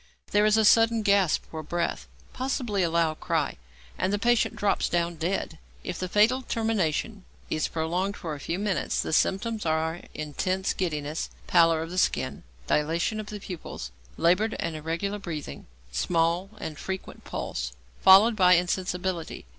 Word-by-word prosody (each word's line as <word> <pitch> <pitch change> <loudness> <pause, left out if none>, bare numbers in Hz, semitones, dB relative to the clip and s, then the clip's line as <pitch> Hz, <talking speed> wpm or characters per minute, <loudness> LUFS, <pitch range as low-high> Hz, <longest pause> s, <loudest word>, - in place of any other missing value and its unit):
There 210 +1 +4
is 215 +1 +4
a 220 - +4
sudden 225 +1 +5
gasp 200 -5 +3
for 160 - -5
breath, 170 - -2 0.3
possibly 250 -6 -1
a 170 - +2
loud 165 -1 +1
cry, 160 -4 -1 0.4
and - - +1
the 205 - +1
patient 235 +3 +2
drops 200 -1 +1
down 170 0 0
dead. 165 -1 -2 0.2
If 180 - -5
the 185 - -3
fatal 220 +7 +4
termination 220 - -1 0.3
is 155 -1 +1
prolonged 175 +5 -2
for 160 -3 -5
a 145 - -7
few 165 +5 -3
minutes, 200 -1 -1
the - - -2
symptoms 215 +6 +1
are 160 +1 0
intense 185 +6 -1
giddiness, 155 -4 -2 0.2
pallor 165 -2 +4
of 165 - -8
the 180 - 0
skin, - - 0 0.2
dilatation 165 - 0
of 215 - -6
the 210 -1 -6
pupils, 170 - -7 0.3
laboured 195 +6 +2
and 165 - -3
irregular 170 +7 -3
breathing, 155 - -6 0.2
small 165 - +1
and 155 -7 -6
frequent 190 0 -6
pulse, - - -4 0.3
followed 205 +5 +8
by 180 -3 +6
insensibility. 180 - -1
180 Hz, 155 wpm, -27 LUFS, 160-205 Hz, 0.4 s, followed